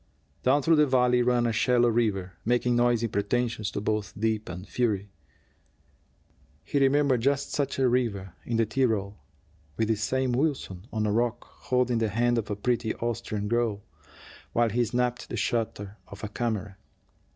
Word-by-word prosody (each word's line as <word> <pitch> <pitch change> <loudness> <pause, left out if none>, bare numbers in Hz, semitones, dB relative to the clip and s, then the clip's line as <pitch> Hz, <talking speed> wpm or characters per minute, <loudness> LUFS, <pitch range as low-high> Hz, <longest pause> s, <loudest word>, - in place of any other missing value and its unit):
Down 135 +3 +3
through 165 +1 +4
the 150 0 +5
valley 125 -1 +3
ran 120 0 +2
a 115 - +1
shallow 120 +2 +3
river, 105 -6 0
making 120 +1 +2
noisy 120 -1 +2
pretensions 110 +1 -1
to - - -4
both 105 -1 -2
depth 110 -1 -1
and 90 +2 -7
fury. 105 -5 -1 1.5
He 145 - 0
remembered 135 -2 +3
just 140 +2 0
such 140 -2 -1
a 135 -1 +3
river 110 -7 0
in 115 - -2
the 115 - +3
Tyrol, 110 - 0 0.6
with 110 - 0
this 110 -1 0
same 130 +4 0
Wilson 120 - -1
on 110 -1 -1
a 105 - +1
rock, 120 +2 0
holding 125 -2 0
the 110 -1 +1
hand 120 +3 +2
of 110 - -5
a 105 - -1
pretty 115 +1 -1
Austrian 115 -3 -3
girl, 115 -3 0 0.7
while 120 -1 +3
he 120 +3 +2
snapped 125 +1 -1
the 120 - -4
shutter 105 -2 -2
of 100 +1 -11
a 105 - -3
camera. 105 -4 -3
115 Hz, 165 wpm, -27 LUFS, 105-125 Hz, 1.5 s, the